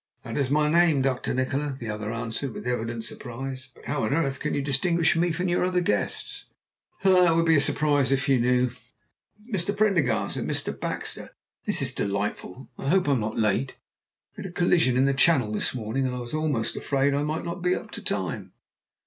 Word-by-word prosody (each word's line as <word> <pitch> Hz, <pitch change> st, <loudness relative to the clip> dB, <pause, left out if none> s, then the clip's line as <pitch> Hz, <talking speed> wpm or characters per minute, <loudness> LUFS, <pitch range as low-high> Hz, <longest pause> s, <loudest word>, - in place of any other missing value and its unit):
"That -, -, -6 dB
is 140 Hz, -3 st, 0 dB
my 150 Hz, +1 st, +3 dB
name, 160 Hz, -3 st, +4 dB
Dr. 130 Hz, -2 st, 0 dB
Nikola," 135 Hz, +2 st, -1 dB
the 120 Hz, -, -7 dB
other 105 Hz, 0 st, -3 dB
answered 115 Hz, +2 st, -4 dB
with -, -, -7 dB
evident 115 Hz, -2 st, -2 dB
surprise. 130 Hz, +3 st, -6 dB
"But -, -, -17 dB
how 145 Hz, -1 st, -1 dB
on 110 Hz, -, 0 dB
earth 140 Hz, -4 st, 0 dB
can 150 Hz, -, -2 dB
you 145 Hz, -, 0 dB
distinguish 165 Hz, +5 st, +2 dB
me 170 Hz, +1 st, +2 dB
from 180 Hz, +3 st, -1 dB
your 175 Hz, 0 st, +1 dB
other 180 Hz, 0 st, +1 dB
guests?" 105 Hz, -, -2 dB, 0.6 s
"Ah! 180 Hz, -3 st, +5 dB
it -, -, +3 dB
would 160 Hz, -3 st, +5 dB
surprise 145 Hz, -3 st, +2 dB
you 135 Hz, -, +4 dB
if 135 Hz, +2 st, -2 dB
you 135 Hz, -2 st, +4 dB
knew. 125 Hz, +1 st, +2 dB, 0.7 s
And 240 Hz, -, -12 dB
Mr. 200 Hz, +2 st, -1 dB
Prendergast, 150 Hz, -, +2 dB
and -, -, -3 dB
Mr. -, -, -1 dB
Baxter. -, -, -5 dB, 0.3 s
This -, -, +1 dB
is -, -, -2 dB
delightful; 100 Hz, +3 st, -3 dB
I 135 Hz, -, -2 dB
hope 185 Hz, -1 st, +3 dB
I -, -, +3 dB
am 135 Hz, -, +2 dB
not 110 Hz, 0 st, -3 dB
late. 100 Hz, -10 st, +1 dB, 0.6 s
We -, -, -7 dB
had 190 Hz, -, -5 dB
a -, -, -11 dB
collision 170 Hz, -7 st, +3 dB
in 130 Hz, -, +4 dB
the 140 Hz, -, +3 dB
Channel 135 Hz, -5 st, +3 dB
this 105 Hz, -, 0 dB
morning, 125 Hz, +3 st, -1 dB
and 125 Hz, -, -3 dB
I -, -, -4 dB
was 120 Hz, +2 st, -8 dB
almost 155 Hz, -7 st, 0 dB
afraid 140 Hz, 0 st, +1 dB
I 140 Hz, -, +1 dB
might 155 Hz, +2 st, -2 dB
not 170 Hz, +1 st, -5 dB
be 180 Hz, +1 st, +2 dB
up -, -, -7 dB
to -, -, -7 dB
time. -, -, -3 dB
135 Hz, 215 wpm, -26 LUFS, 125-165 Hz, 0.7 s, Ah